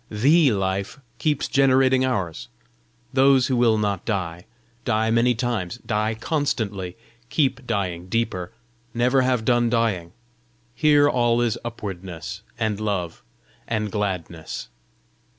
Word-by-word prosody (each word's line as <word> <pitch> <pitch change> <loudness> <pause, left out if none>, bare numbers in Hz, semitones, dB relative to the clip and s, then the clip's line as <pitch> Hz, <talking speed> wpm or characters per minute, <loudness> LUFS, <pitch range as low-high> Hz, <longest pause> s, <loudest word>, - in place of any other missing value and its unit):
THE 140 +7 +4
Life 95 +4 -2 0.2
keeps 145 +3 0
generating 130 -1 +4
ours. 95 -11 -2 0.7
Those 135 -1 +5
who 130 - 0
will 120 -2 +4
not 100 -3 -1
die, 90 -5 -3 0.4
die 110 -1 +1
many 120 +1 +3
times, 120 -5 -2
die 110 0 0
constantly, 110 - -2 0.3
keep 135 -4 0
dying 90 -5 -2
deeper, 95 -5 -2 0.4
never 125 +3 +3
have 125 -3 +1
done 120 -1 +3
dying; 105 -8 0 0.6
here 145 +2 +4
all 120 -3 +2
is 120 -3 +1
upwardness 95 -7 -6 0.2
and 110 -2 -1
love 100 -6 -2 0.5
and 110 -2 -1
gladness." 90 -6 -4
115 Hz, 115 wpm, -23 LUFS, 95-125 Hz, 0.7 s, Those